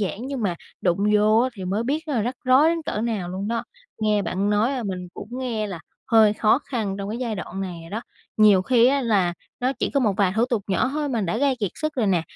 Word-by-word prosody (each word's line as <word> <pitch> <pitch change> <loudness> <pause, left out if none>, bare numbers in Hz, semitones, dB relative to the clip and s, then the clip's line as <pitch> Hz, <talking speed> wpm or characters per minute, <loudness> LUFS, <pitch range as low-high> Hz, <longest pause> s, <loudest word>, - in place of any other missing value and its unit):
giản 205 +4 -3
nhưng 270 -4 -4
mà 185 -4 0 0.3
đụng 175 0 +1 0.2
vô 215 +1 +4
á 255 - +2
thì 190 -4 -7
mới 200 +5 -1
biết 310 +5 -2
là 250 -7 0
rắc 245 +4 -2
rối 260 +5 +5
đến 330 0 0
cỡ 210 - -3
nào 215 -6 -2
luôn 190 +3 -4
đó. 230 0 -2 0.3
Nghe 210 -1 +1
bạn 190 +3 -1
nói 210 +5 +2
là 260 -3 -2
mình 185 -4 -4
cũng - - -8
nghe 235 -5 -2
là 185 -5 -6 0.3
hơi 220 -3 +6
khó 215 +3 +3
khăn 230 -9 -3
trong 200 - -4
cái 225 - -4
giai 235 -4 -2
đoạn 190 0 -6
này 180 -3 -5
rồi 165 0 -12
đó. 220 - -3 0.4
Nhiều 210 -3 +6
khi 240 +2 +4
á 275 +2 +3
là 200 -7 +2 0.3
nó 255 +2 +1
chỉ - - -1
có 280 - +1
một 220 -5 +2
vài 195 -3 +2
thủ 225 - +4
tục 235 -5 -1
nhỏ 195 +6 +1
thôi 300 -1 -1
mà 235 -5 -1
đã 195 +2 -1
gây 270 +1 +2
kiệt 205 -4 0
sức 310 0 -3
rồi 235 -5 0
nè, 180 -4 +2
215 Hz, 265 wpm, -23 LUFS, 195-255 Hz, 0.4 s, hơi